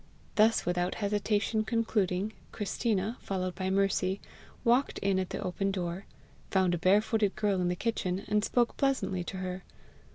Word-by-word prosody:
Thus 220 +1 +4
without 175 +1 0
hesitation 210 +1 0
concluding, 215 -3 0 0.2
Christina, 210 +1 -1
followed 185 -2 -2
by 190 +1 -2
Mercy, 195 0 +1 0.4
walked 245 +4 +3
in 195 -1 +1
at 185 - -2
the - - -4
open 195 +2 -1
door, 185 -1 -3 0.4
found 190 -2 +2
a 175 - -1
barefooted 205 +3 +3
girl 205 -3 +1
in 180 - +1
the 180 - 0
kitchen, 195 -2 -2
and 210 0 +2
spoke 240 +1 +1
pleasantly 265 -10 +1
to 190 - -6
her. 185 0 -4
195 Hz, 155 wpm, -30 LUFS, 185-215 Hz, 0.4 s, Thus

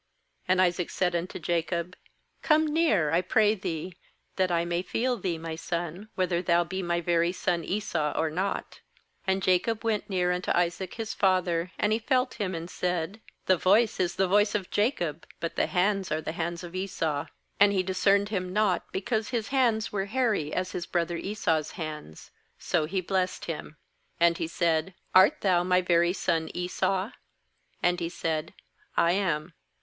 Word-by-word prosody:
21And 185 0 +4
Isaac 180 -1 +2
said 180 -2 0
unto 170 +2 -3
Jacob: 170 +1 -2 0.5
'Come 315 0 +4
near, 295 - +2
I 170 +2 +3
pray 210 +3 +3
thee, 180 -3 -5 0.4
that 185 -1 +2
I 170 0 +1
may 170 0 -1
feel 245 +6 0
thee, 180 -6 -2
my 160 0 -5
son, 170 +4 -4
whether 180 -2 +1
thou 175 -1 +3
be 190 +2 -4
my 170 -1 0
very 170 0 +2
son 175 -2 -1
Esau 170 -6 -1
or 160 -1 +1
not.' 190 +5 -3 0.5
^And 190 0 +1
Jacob 190 +5 +1
went 220 -2 -1
near 180 -2 +1
unto 180 0 -2
Isaac 175 +2 -1
his 225 -1 -4
father; 180 -2 +1
and 210 +1 +2
he 220 - +1
felt 255 +2 +1
him, 190 -3 -1
and 165 0 -5
said: 180 +3 -2 0.2
'The 185 - +4
voice 205 +6 +3
is 175 -2 0
the 190 - +2
voice 205 +3 +3
of 195 -3 -2
Jacob, 175 - 0
but 165 - -4
the - - +1
hands 195 +1 +1
are 155 - +1
the 155 - -4
hands 170 +1 -3
of 175 0 -8
Esau.' 165 -5 -2 0.3
^And 200 0 +7
he 190 -2 +1
discerned 195 +2 +2
him 185 -4 -2
not, 205 -3 +1
because 220 +3 -1
his 235 -4 -2
hands 235 -5 +2
were 195 -2 -1
hairy, 215 - 0
as 185 +2 -2
his 175 - -4
brother 170 0 -1
Esau's 165 -6 -1
hands; 150 - -7 0.3
so 165 -3 0
he 185 +4 -1
blessed 185 0 -1
him, 155 -2 -6 0.4
24Andhesaid: 170 0 +1 0.2
'Art 190 +12 +6
thou 185 -3 +3
my 180 0 +3
very 175 -1 +3
son 165 -4 0
Esau?' 185 +3 -1 0.7
And 180 0 +2
he 170 -1 -2
said: 160 -2 -3 0.4
'I 170 - +4
am.' 175 -4 -1
180 Hz, 175 wpm, -28 LUFS, 170-200 Hz, 0.7 s, ^And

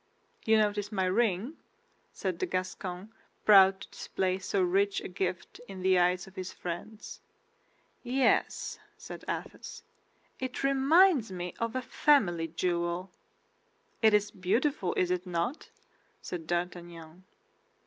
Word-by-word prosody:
"You 220 0 +5
notice 205 -1 0
my 190 -3 0
ring?" 215 - 0 0.5
said 185 -3 -4
the - - -1
Gascon, 185 +2 -4 0.3
proud 195 -2 +7
to - - -10
display 185 0 -2
so 195 - -1
rich 195 +3 +2
a - - -6
gift 180 0 -4
in 190 -2 -8
the 185 -1 +4
eyes 180 0 +2
of 190 0 -16
his 185 0 -5
friends. 180 +5 -7 0.8
"Yes," 260 - +1 0.2
said 455 +1 -9
Athos, - - -6 0.6
"it 260 0 -4
reminds 275 - +4
me 180 -1 -5
of 230 +1 -2
a 255 - -1
family 190 - +2
jewel." 175 +2 -2 0.9
"It 220 -2 +6
is 210 0 +1
beautiful, 200 +3 0
is 180 -1 +1
it 180 0 -2
not?" 175 - -3 0.5
said 165 -3 -7
D'Artagnan. 175 -1 -5
190 Hz, 130 wpm, -30 LUFS, 180-220 Hz, 0.9 s, proud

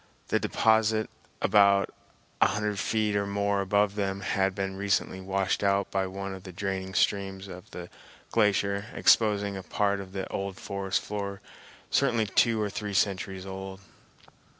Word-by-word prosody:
The - - +2
deposit, 110 0 +2 0.3
about 100 -1 +4 0.5
a - - +7
hundred 105 -1 -1
feet 110 -2 0
or 100 0 0
more 100 0 0
above 100 +1 +2
them, 100 -1 -2
had 95 -1 0
been 95 -1 -2
recently 95 -1 0
washed 95 +1 -1
out 100 0 +2
by 95 -1 0
one 95 +1 -5
of 95 - -8
the 95 0 -9
draining 95 0 -4
streams 95 -1 0
of 90 -1 -10
the 90 -1 -8 0.4
glacier, 100 -2 +2
exposing 105 -2 +3
a 95 - -5
part 100 +2 0
of 95 -1 -8
the 95 -1 -3
old 95 -1 -4
forest 100 -1 -2
floor 100 -1 -4 0.5
certainly 120 -5 +2
two 115 +3 +3
or 105 -1 -1
three 105 -1 -4
centuries 95 0 0
old. 95 0 -7
100 Hz, 155 wpm, -28 LUFS, 95-105 Hz, 0.5 s, a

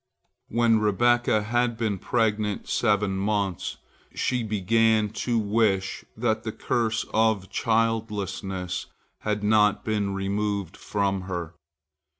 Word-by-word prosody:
When 115 -1 +3
Rebekah 110 +1 +2
had 120 +1 0
been 110 -4 -1
pregnant 105 -2 0
seven 105 -3 +1
months, 100 -2 -1 0.4
she 125 -1 0
began 110 +1 +2
to 120 +2 -1
wish 100 -3 +1
that - - 0
the - - -4
curse 115 -1 -1
of 110 -4 +2
childlessness 105 -5 -1 0.3
had 105 -1 -2
not 105 -1 +3
been 105 -3 -1
removed 100 -1 -2
from 100 -2 -1
her. 85 -2 -4
105 Hz, 110 wpm, -26 LUFS, 100-115 Hz, 0.4 s, When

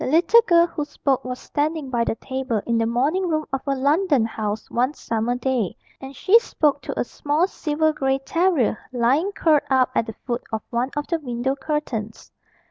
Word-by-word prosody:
The - - -2
little 335 - +5
girl 340 -1 +6
who 325 -3 -4
spoke 280 -2 -1
was 250 0 -4
standing 295 -1 -2
by 235 -2 +1
the - - -1
table 260 -2 -3
in 235 -1 +1
the 225 - +1
morning 290 +11 +1
room 310 -1 0
of 270 - -1
a 275 - +1
London 285 - +2
house 215 -1 -4
one 255 +5 0
summer 230 +2 -1
day, 250 -6 -1 0.2
and 270 +1 -9
she 420 - +5
spoke 295 - 0
to - - -5
a - - +2
small 295 +6 0
silver 315 -4 0
grey 270 -2 0
terrier 315 - +1
lying 260 +10 +2
curled 315 -6 +3
up 260 -2 +3
at 225 - 0
the 225 - -7
foot 240 -1 -2
of 220 -1 -3
one 240 +2 0
of 295 - -1
the 335 +1 -1
window 255 -1 -2
curtains. 265 -7 -4
270 Hz, 200 wpm, -23 LUFS, 240-310 Hz, 0.2 s, girl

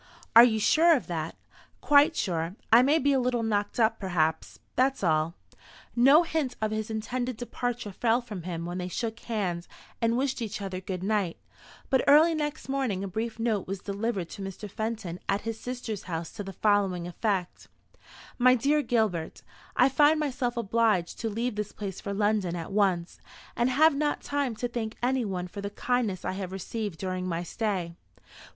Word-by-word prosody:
"Are 230 - +12
you 220 -3 +3
sure 325 +9 +5
of 265 - -2
that?" 165 -2 -4 0.4
"Quite 295 +3 +5
sure. 170 -1 -1 0.2
I 235 - +9
may 285 +5 +4
be 285 -2 +2
a 270 - +3
little 245 -2 0
knocked 210 0 -1
up 225 0 +3
perhaps; 160 -5 -1 0.2
that's 265 -2 +1
all." 160 0 +1 0.6
No 275 +7 +7
hint 315 -6 -2
of 215 -1 -1
his 215 0 -3
intended 240 +2 -3
departure 245 -2 -3
fell 230 +4 +2
from 215 -7 -7
him 170 -1 -5
when 175 +1 -4
they 180 - -3
shook 225 +5 -3
hands 185 -8 -3 0.3
and 230 +1 +2
wished 265 -1 -1
each 220 -2 -4
other 190 -2 -5
good 185 -1 -5
night; 200 -4 0 0.5
but 265 - +3
early 310 +4 +7
next 300 -1 -3
morning 260 -8 -1
a - - -3
brief 225 +4 -3
note 225 -4 -1
was 195 +1 -3
delivered 200 -1 -3
to - - -8
Mr. 195 +2 -6
Fenton 215 -4 -4
at 200 +1 +1
his 225 -1 -4
sister's 245 -5 -5
house 165 -1 -4
to 205 - -6
the 195 0 -7
following 195 -4 +1
effect: 185 0 -2 0.7
"MY 255 +1 +6
DEAR 285 +5 +2
GILBERT, 215 - -1 0.3
I 255 - +6
find 295 +3 +4
myself 255 -5 -1
obliged 220 -5 +1
to 225 - -2
leave 230 +3 -2
this 210 0 -4
place 195 -3 -6
for 200 - -4
London 205 -3 +1
at 165 +1 -6
once, 190 -4 +1 0.4
and 240 +2 +2
have 310 +5 +5
not 295 +1 -1
time 285 -5 -1
to 245 +3 -2
thank 230 -2 -4
anyone 220 -8 0
for 200 +3 -8
the 200 - -3
kindness 225 -3 -1
I - - 0
have 190 -1 -5
received 195 0 -4
during 185 0 -3
my 170 -1 -2
stay. 185 -3 -2
220 Hz, 185 wpm, -28 LUFS, 185-245 Hz, 0.7 s, Are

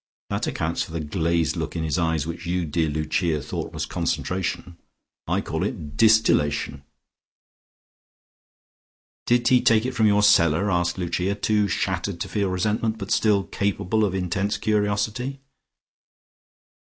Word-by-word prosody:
That - - -1
accounts 80 +2 -2
for 80 - -5
the 85 - -2
glazed 80 -1 0
look - - -4
in 80 - -2
his 80 +3 -1
eyes 80 -3 0
which 85 +1 -6
you, 90 0 0
dear 80 +1 0
Lucia, 75 +2 0
thought 65 - -5
was - - -3
concentration. 90 -1 -3 0.5
I - - +1
call - - -4
it 75 -1 -5
distillation." 75 -10 +3 2.4
"Did 120 0 +3
he 125 -1 +5
take 115 0 +3
it 130 - -1
from 110 -3 +3
your 105 0 +3
cellar?" 85 0 +4
asked 90 0 0
Lucia, 90 +2 -1
too 105 0 +1
shattered 95 -3 -2
to - - -2
feel 100 +1 -1
resentment, 110 +4 0
but 100 -2 -6
still 105 -3 +3
capable 100 +2 -1
of 95 -3 0
intense 100 +3 -1
curiosity. 110 +5 -1
95 Hz, 140 wpm, -24 LUFS, 85-105 Hz, 2.4 s, he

